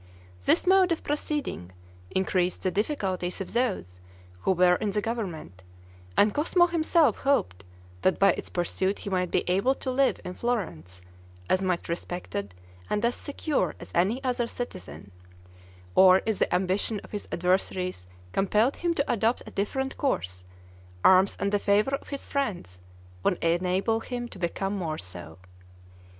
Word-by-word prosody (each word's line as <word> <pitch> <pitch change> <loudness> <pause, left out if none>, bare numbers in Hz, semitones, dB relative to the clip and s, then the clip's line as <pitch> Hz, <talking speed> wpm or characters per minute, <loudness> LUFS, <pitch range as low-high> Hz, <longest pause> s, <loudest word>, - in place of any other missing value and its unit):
This - - +3
mode 375 -1 +5
of 335 - -1
proceeding 295 - -3 0.4
increased 185 -1 0
the 185 - +1
difficulties 195 - -1
of 195 - -6
those 195 - -1 0.4
who 140 - +1
were 180 -1 +5
in 210 - -1
the 205 +1 0
government, 195 - -4 0.6
and 210 0 +5
Cosmo 345 +4 +3
himself 335 -2 +3
hoped 95 - 0 0.4
that 185 - +2
by 195 - +5
its - - -5
pursuit 185 +2 -1
he 200 - -6
might 180 -1 0
be - - +1
able 195 +9 +2
to 260 - -3
live 265 +1 +2
in 180 - -4
Florence 160 - -3 0.5
as 185 - +2
much 185 -2 -1
respected 170 - -4 0.3
and 210 +2 +1
as 235 - +2
secure 285 +2 -2
as - - -11
any 210 +10 +1
other 245 -2 0
citizen; 90 - -7 0.8
or 185 - +7
if 220 -2 -1
the - - +1
ambition 190 +4 0
of - - -14
his 205 - -5
adversaries 180 - 0 0.2
compelled 210 - +2
him 345 -1 0
to 280 - +1
adopt 230 +2 +1
a - - -10
different 265 +7 -2
course, 90 - -1 0.6
arms 190 +1 +5
and 200 - 0
the 205 - +2
favor 210 +7 +2
of 275 - -3
his 280 -1 -6
friends 185 - -3 0.4
would 180 - +1
enable 185 +6 +1
him 245 +1 -5
to 200 - -12
become 195 +3 -2
more 165 -5 -3
so. 90 - -8
195 Hz, 155 wpm, -27 LUFS, 175-245 Hz, 0.8 s, or